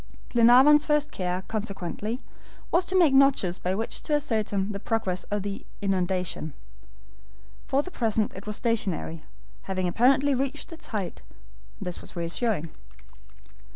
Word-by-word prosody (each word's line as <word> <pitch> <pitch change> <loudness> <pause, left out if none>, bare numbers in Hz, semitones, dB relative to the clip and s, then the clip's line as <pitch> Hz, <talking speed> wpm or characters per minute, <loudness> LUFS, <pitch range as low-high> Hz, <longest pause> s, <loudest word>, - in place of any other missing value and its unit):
Glenarvan's 255 +5 +7
first 300 0 +1
care, 180 0 -2
consequently, 210 +2 -4 0.5
was 350 +2 +3
to 375 - +1
make 330 -7 +5
notches 270 -10 +4
by 185 +1 -1
which 225 +3 -3
to 300 - 0
ascertain 215 -8 0
the 200 - -5
progress 195 -4 -1
of 205 -1 -2
the 200 -1 -5 0.2
inundation. 185 -5 -1 1.1
For 275 +2 +1
the 370 - -8
present 220 - 0
it 190 +3 -10
was 210 - -1
stationary, 195 -9 -1 0.5
having 185 -1 0
apparently 265 +8 +3
reached 270 +5 -2
its 330 - -9
height. 205 -6 -4 0.6
This 180 -1 -5
was - - -11
reassuring. 170 0 -1
215 Hz, 135 wpm, -26 LUFS, 185-270 Hz, 1.1 s, Glenarvan's